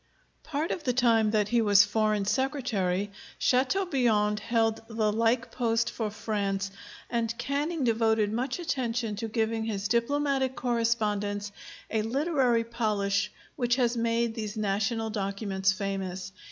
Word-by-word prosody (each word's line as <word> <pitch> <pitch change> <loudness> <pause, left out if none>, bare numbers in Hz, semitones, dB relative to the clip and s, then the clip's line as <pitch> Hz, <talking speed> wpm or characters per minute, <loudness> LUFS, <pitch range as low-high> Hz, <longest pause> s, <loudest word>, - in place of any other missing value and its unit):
Part 310 +2 -2
of 330 - -3
the 250 -4 +1
time 230 -3 +3
that 210 -1 +1
he 235 0 +3
was 205 -1 +6
Foreign 215 -1 +1
Secretary, 205 -6 0 0.3
Châteaubriand 250 - +2
held 225 -1 +1
the 220 -2 0
like 230 +2 +1
post 235 -2 0
for 220 -2 -2
France, 200 -2 -2 0.4
and 230 -1 -1
Canning 285 +5 -1
devoted 220 -2 +2
much 250 +3 -1
attention 245 -9 -2
to 225 +1 -3
giving 225 0 -1
his 205 -2 -2
diplomatic 265 +3 +1
correspondence 210 -4 0 0.4
a 220 - +1
literary 255 -1 +1
polish 210 -3 0 0.2
which 240 -1 +1
has 245 -2 +1
made 230 0 +1
these 215 -1 -5
national 215 +2 0
documents 195 -2 0
famous. 190 -1 -4
225 Hz, 130 wpm, -28 LUFS, 210-245 Hz, 0.4 s, was